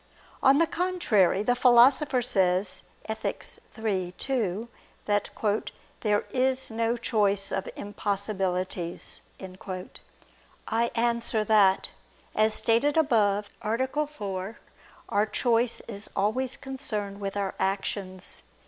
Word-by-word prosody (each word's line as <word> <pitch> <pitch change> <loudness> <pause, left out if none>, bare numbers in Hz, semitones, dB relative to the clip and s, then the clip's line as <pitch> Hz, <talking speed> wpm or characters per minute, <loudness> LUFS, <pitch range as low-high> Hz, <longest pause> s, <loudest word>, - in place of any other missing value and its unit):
On 270 +1 +6
the 335 - +5
contrary, 325 - +2
The 245 - +3
Philosopher 250 +2 +5
says 190 -4 +2 0.2
(Ethic. 220 0 -3 0.3
iii, 190 -5 -1
2) 225 -5 -1 0.4
that 205 -1 +1 0.7
"there 210 -2 +1
is 260 -1 +1
no 230 +1 0
choice 205 -4 +1
of 195 - -2
impossibilities." 195 -4 -3 1.5
I 230 +1 +1
answer 235 -2 +1
that, 205 -3 +4 0.4
As 215 0 +3
stated 260 +7 +2
above 210 -8 +2
(A. 260 +7 0
4), 200 -6 -5 0.5
our 205 +1 +2
choice 235 +1 +1
is 205 -2 -7
always 230 +6 0
concerned 215 -8 -3
with 200 0 -4
our 200 -1 -1
actions. 190 -1 -2
215 Hz, 105 wpm, -27 LUFS, 200-245 Hz, 1.5 s, On